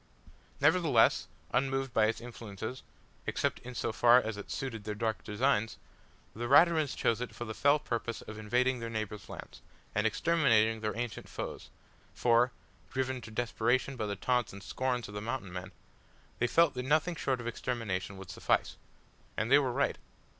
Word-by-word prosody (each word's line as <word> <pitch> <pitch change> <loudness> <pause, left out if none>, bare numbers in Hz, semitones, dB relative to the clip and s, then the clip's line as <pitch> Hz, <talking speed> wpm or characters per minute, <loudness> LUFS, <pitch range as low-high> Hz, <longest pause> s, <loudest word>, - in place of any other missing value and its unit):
Nevertheless, 145 -5 +4 0.3
unmoved 135 -1 0
by 110 -1 +4
its 110 - -1
influences 115 0 -7 0.5
except - - 0
in 125 0 -9
so - - -1
far 120 +2 +7
as 110 -3 -3
it 105 - -8
suited 115 -6 -4
their 105 0 -4
dark 110 +1 -2
designs 110 0 +1 0.6
the 120 +2 -3
Raturans 155 +1 +5
chose 115 0 +1
it 125 - -5
for 120 - -5
the 110 - -5
fell 145 +5 +4
purpose 115 -5 -3
of 110 0 -8
invading 125 +4 +1
their 115 0 -4
neighbours' 110 -2 -5
lands, - - -9 0.3
and 105 +1 +2
exterminating 115 -6 +3
their 110 0 -3
ancient 120 -2 -4
foes; - - -6 0.5
for, 120 +1 +4 0.4
driven 130 -1 -2
to 115 - -9
desperation 120 +3 0
by 110 -4 -2
the 100 - -2
taunts 125 +2 0
and 100 0 -10
scorn 125 +1 -1
of 105 - -10
the 105 - -4
Mountain 110 -4 -4
men, 90 +1 -6 0.7
they 120 - +2
felt 165 +2 +4
that 125 - -3
nothing 155 +6 +2
short 135 -5 -1
of 115 - -7
extermination 110 -5 -3
would 95 -1 -9
suffice. - - 0 0.6
And 110 +3 -1
they 140 - +8
were 135 -3 0
right. - - 0
120 Hz, 175 wpm, -31 LUFS, 110-130 Hz, 0.7 s, they